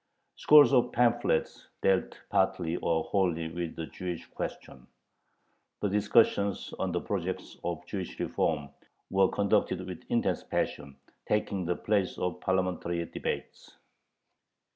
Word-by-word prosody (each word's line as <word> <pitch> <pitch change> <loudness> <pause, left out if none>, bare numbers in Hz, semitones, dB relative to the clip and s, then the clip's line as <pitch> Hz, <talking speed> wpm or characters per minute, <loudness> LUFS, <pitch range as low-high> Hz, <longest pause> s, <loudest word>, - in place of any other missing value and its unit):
Scores 145 -3 +7
of 125 -1 +4
pamphlets 120 -7 +1 0.2
dealt 95 -1 +2
partly 95 -4 +1
or 80 -1 0
wholly 85 -4 0
with 85 0 -4
the 80 - -4
Jewish 90 0 -6
question. 65 - -7 0.9
The 105 - 0
discussions 100 0 +2
on - - -1
the - - 0
projects - - -4
of 85 0 -3
"Jewish 95 -1 -5
reform" 75 -3 -1 0.4
were 95 -1 +4
conducted 100 -1 +1
with - - -8
intense - - +1
passion, 70 -1 -3 0.3
taking 100 -3 0
the 90 +1 0
place 100 -1 0
of 90 -1 -2
parliamentary 90 -2 -1
debates. - - -5
95 Hz, 120 wpm, -29 LUFS, 85-100 Hz, 0.9 s, Scores